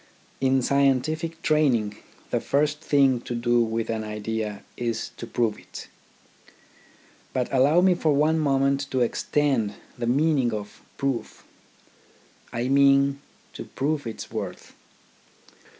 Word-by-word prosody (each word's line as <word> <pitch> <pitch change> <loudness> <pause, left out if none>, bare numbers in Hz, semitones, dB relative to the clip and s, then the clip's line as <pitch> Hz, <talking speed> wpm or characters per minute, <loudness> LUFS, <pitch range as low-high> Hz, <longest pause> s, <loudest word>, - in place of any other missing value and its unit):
In 130 -1 +2
scientific 155 +5 +1
training, 125 -9 +2 0.4
the - - +1
first 150 +1 0
thing 135 -4 +3
to 120 - -5
do 120 0 +2
with 115 0 -1
an 110 -1 -2
idea 105 0 -4
is 115 -2 -3
to 115 - -7
prove 115 -3 -1
it. - - -11 1.4
But 125 -2 0
allow 140 +6 +4
me 185 0 +5
for 160 -3 +1
one 155 +3 +3
moment 140 -1 +1
to 130 - 0
extend 125 -2 0 0.2
the 120 - -2
meaning 135 -2 +2
of 105 -1 -8
" - - -33
prove 135 -3 -3 0.5
"; - - -31
I 120 +1 -2
mean 140 0 +4 0.2
— - - -33
to - - -7
prove 145 -1 -2
its 110 - -7
worth. - - -6
135 Hz, 135 wpm, -25 LUFS, 115-145 Hz, 1.4 s, me